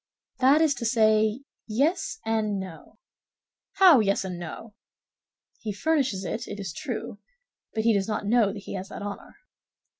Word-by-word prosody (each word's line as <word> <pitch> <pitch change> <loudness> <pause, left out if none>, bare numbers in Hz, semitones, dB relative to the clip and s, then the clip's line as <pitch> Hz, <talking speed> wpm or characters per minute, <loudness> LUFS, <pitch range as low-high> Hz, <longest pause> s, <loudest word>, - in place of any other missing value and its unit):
"That 270 +4 +5
is 315 -3 +4
to - - -2
say, 220 0 +3 0.3
yes 240 - 0
and 215 -3 0
no." 185 -4 -10 0.8
"How 375 -8 +7
yes 200 -2 +1
and 180 -2 -5
no?" 190 +6 -8 0.9
"He 215 - -4
furnishes 260 -7 0
it, 230 +5 -4
it 205 - -7
is 190 -5 -5
true, 235 - -5 0.6
but 220 - 0
he 230 0 +4
does 195 -2 0
not 215 -1 -2
know 225 0 +4
that 200 -1 -8
he - - -7
has 190 0 -5
that 205 - -7
honor." 205 0 -7
220 Hz, 160 wpm, -26 LUFS, 200-245 Hz, 0.9 s, How